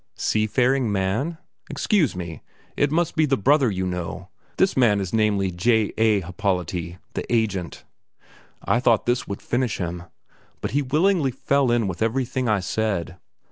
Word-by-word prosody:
"Sea 110 Hz, 0 st, 0 dB
faring 125 Hz, 0 st, +2 dB
man? 100 Hz, -, -1 dB, 0.3 s
Excuse 175 Hz, -, +1 dB
me, 85 Hz, -3 st, -6 dB, 0.3 s
it 145 Hz, -, +2 dB
must 170 Hz, +1 st, 0 dB
be 155 Hz, -1 st, +3 dB
the 135 Hz, -1 st, +2 dB
brother 135 Hz, +3 st, +3 dB
you 95 Hz, -2 st, -2 dB
know; 90 Hz, 0 st, -5 dB, 0.3 s
this 190 Hz, -, +2 dB
man 115 Hz, -6 st, +4 dB
is 95 Hz, -3 st, -4 dB
namely 105 Hz, -4 st, +2 dB
J. 110 Hz, +4 st, +1 dB
A. 110 Hz, -3 st, +3 dB
Happolati, 90 Hz, -1 st, -3 dB, 0.2 s
the -, -, -5 dB
agent." 100 Hz, -7 st, -1 dB, 0.8 s
I 120 Hz, -, +2 dB
thought 115 Hz, -3 st, +3 dB
this 120 Hz, +1 st, 0 dB
would 100 Hz, -, -6 dB
finish 120 Hz, -3 st, -1 dB
him; 90 Hz, -1 st, -4 dB, 0.5 s
but -, -, -4 dB
he 145 Hz, -, +1 dB
willingly 155 Hz, +3 st, +2 dB
fell 135 Hz, +1 st, +1 dB
in 120 Hz, -3 st, +2 dB
with 90 Hz, 0 st, -5 dB
everything 125 Hz, +2 st, 0 dB
I 105 Hz, -2 st, +2 dB
said. 95 Hz, -4 st, -2 dB
110 Hz, 160 wpm, -23 LUFS, 95-130 Hz, 0.8 s, man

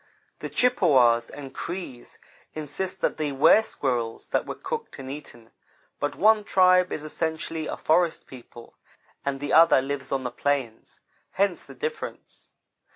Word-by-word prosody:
The -, -, -5 dB
Chippewas 130 Hz, -, +3 dB
and 135 Hz, -2 st, -9 dB
Crees 170 Hz, -9 st, -7 dB, 0.4 s
insist 155 Hz, +5 st, -4 dB
that -, -, 0 dB
they 150 Hz, -2 st, -1 dB
were 155 Hz, +10 st, +6 dB
squirrels 120 Hz, -, -3 dB
that -, -, 0 dB
were -, -, -4 dB
cooked 465 Hz, -1 st, -6 dB
and 135 Hz, -1 st, -7 dB
eaten, 120 Hz, -6 st, -10 dB, 0.5 s
but -, -, -2 dB
one 215 Hz, +1 st, +4 dB
tribe 185 Hz, -2 st, +4 dB
is 150 Hz, -, -4 dB
essentially 160 Hz, 0 st, -3 dB
a -, -, -4 dB
forest 165 Hz, +1 st, +1 dB
people 120 Hz, -2 st, -13 dB, 0.5 s
and 140 Hz, -1 st, -2 dB
the 145 Hz, +1 st, -3 dB
other 165 Hz, -2 st, +7 dB
lives 135 Hz, 0 st, -4 dB
on 135 Hz, -1 st, -1 dB
the 125 Hz, -, -3 dB
plains 130 Hz, -3 st, -3 dB, 0.3 s
hence 195 Hz, -2 st, +1 dB
the -, -, -13 dB
difference. 465 Hz, 0 st, -6 dB
150 Hz, 150 wpm, -25 LUFS, 130-180 Hz, 0.5 s, other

